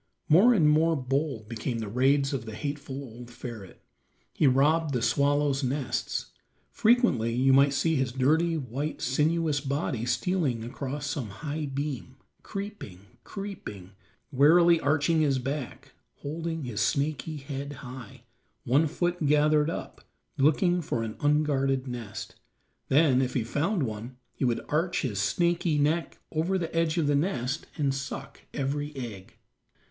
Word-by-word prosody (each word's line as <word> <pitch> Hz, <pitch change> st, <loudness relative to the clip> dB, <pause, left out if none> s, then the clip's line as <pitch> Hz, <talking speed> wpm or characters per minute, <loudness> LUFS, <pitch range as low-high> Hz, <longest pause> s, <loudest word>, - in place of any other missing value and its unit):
More 190 Hz, +11 st, +7 dB
and 160 Hz, -7 st, +4 dB
more 160 Hz, +2 st, +4 dB
bold 135 Hz, -4 st, -2 dB
became 115 Hz, +2 st, -3 dB
the 110 Hz, -2 st, -4 dB
raids 135 Hz, +5 st, +2 dB
of 125 Hz, -4 st, -3 dB
the 110 Hz, -, -6 dB
hateful 140 Hz, +2 st, -5 dB
old 120 Hz, -1 st, -10 dB
ferret. 120 Hz, -5 st, -9 dB, 0.5 s
He 150 Hz, -, +3 dB
robbed 145 Hz, +3 st, +3 dB
the 120 Hz, -, 0 dB
swallows' 140 Hz, +3 st, +2 dB
nests; 130 Hz, +1 st, -2 dB, 0.4 s
frequently 215 Hz, -, +3 dB
you 135 Hz, +2 st, +4 dB
might 140 Hz, +1 st, +6 dB
see 160 Hz, +2 st, +1 dB
his 130 Hz, -2 st, 0 dB
dirty 160 Hz, +6 st, +2 dB
white, 140 Hz, +2 st, -4 dB
sinuous 150 Hz, +3 st, +1 dB
body 135 Hz, -4 st, -2 dB
stealing 130 Hz, -2 st, 0 dB
across 135 Hz, +4 st, -5 dB
some 140 Hz, -6 st, -3 dB
high 150 Hz, +8 st, -4 dB
beam, 135 Hz, -2 st, -4 dB, 0.3 s
creeping, 200 Hz, -, -7 dB, 0.2 s
creeping, 190 Hz, -, -7 dB, 0.4 s
warily 165 Hz, +5 st, +6 dB
arching 155 Hz, +2 st, +2 dB
his 140 Hz, -3 st, +2 dB
back, 135 Hz, +1 st, -5 dB, 0.3 s
holding 160 Hz, +2 st, -4 dB
his 120 Hz, -5 st, -3 dB
snaky 150 Hz, +1 st, -1 dB
head 140 Hz, 0 st, -6 dB
high, 130 Hz, 0 st, -10 dB, 0.4 s
one 140 Hz, +6 st, +3 dB
foot 175 Hz, 0 st, -1 dB
gathered 150 Hz, +1 st, +4 dB
up, -, -, -6 dB, 0.3 s
looking 175 Hz, +5 st, +3 dB
for 120 Hz, -7 st, -2 dB
an 110 Hz, -1 st, -5 dB
unguarded 140 Hz, -3 st, +1 dB
nest; 120 Hz, -4 st, -6 dB, 0.6 s
then, 135 Hz, -2 st, +4 dB
if 130 Hz, -1 st, -2 dB
he 125 Hz, -, +1 dB
found 155 Hz, -, 0 dB
one, 115 Hz, +2 st, -5 dB, 0.2 s
he -, -, -4 dB
would 120 Hz, -2 st, 0 dB
arch 165 Hz, +4 st, 0 dB
his 105 Hz, -7 st, -2 dB
snaky 170 Hz, -, +1 dB
neck 155 Hz, +3 st, 0 dB
over 165 Hz, +5 st, 0 dB
the 165 Hz, -2 st, -4 dB
edge 165 Hz, 0 st, +1 dB
of 165 Hz, -, +2 dB
the 145 Hz, -, +2 dB
nest 140 Hz, -3 st, -1 dB
and 140 Hz, -3 st, +1 dB
suck 135 Hz, -1 st, -6 dB
every 145 Hz, +1 st, -3 dB
egg. 110 Hz, -8 st, -7 dB
140 Hz, 145 wpm, -28 LUFS, 125-155 Hz, 0.6 s, More